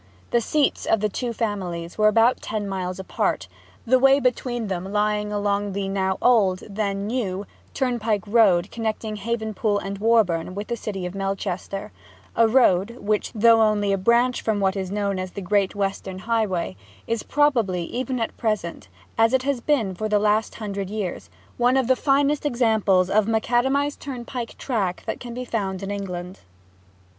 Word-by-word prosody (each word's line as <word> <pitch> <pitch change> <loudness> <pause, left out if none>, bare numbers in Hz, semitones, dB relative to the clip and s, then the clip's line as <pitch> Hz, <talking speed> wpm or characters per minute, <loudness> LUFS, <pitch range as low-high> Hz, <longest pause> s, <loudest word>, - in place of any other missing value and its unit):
The 235 - +3
seats 290 +5 0
of 225 - +3
the 210 +1 0
two 240 +4 -3
families 185 -7 -3
were 215 0 +4
about 225 +4 +4
ten 210 -1 -3
miles 185 -2 -3
apart, 190 - -1 0.4
the 255 +2 +4
way 270 +1 +6
between 245 -2 -1
them 190 -1 -4
lying 210 0 0
along 205 -1 -1
the 195 0 -2
now 190 -1 0
old, 200 -7 +3
then 200 -1 -2
new, 205 -4 -2 0.3
turnpike 230 -6 0
road 200 -4 +3
connecting 220 -1 -3
Havenpool 220 -1 -1
and 195 0 -5
Warborne 195 -6 +2
with 205 +3 -5
the 235 - 0
city 195 -5 -5
of 180 - -5
Melchester: 195 0 -3 0.4
a 230 0 +5
road 225 -2 +3
which, 210 0 -1
though 225 +1 +6
only 205 -2 +2
a - - +1
branch 235 +5 +3
from 220 -2 0
what 190 0 +1
was 190 -2 -3
known 200 -1 -1
as 185 -1 -5
the - - -5
Great 195 +1 +1
Western 195 -1 -3
Highway, 190 - -1 0.3
is 230 -1 -1
probably, 235 -12 +1
even 255 +7 -3
at 225 - -2
present, 210 - -2 0.3
as 225 +2 +4
it 260 -1 +3
has 275 -3 -1
been 235 -9 +1
for 215 +4 -3
the 210 - +3
last 210 +1 +1
hundred 200 -3 -4
years, 205 -4 -4 0.3
one 245 +2 +3
of 265 - +2
the 260 +2 +3
finest 280 +2 +2
examples 220 -8 +2
of 210 +1 +3
a - - 0
macadamized 265 +6 +1
turnpike 245 -3 -6
track 200 -9 -2
that - - -3
can 240 -1 -8
be 250 0 -4
found 195 -5 -3
in 195 - -4
England. 185 -2 -5
210 Hz, 175 wpm, -23 LUFS, 195-235 Hz, 0.4 s, way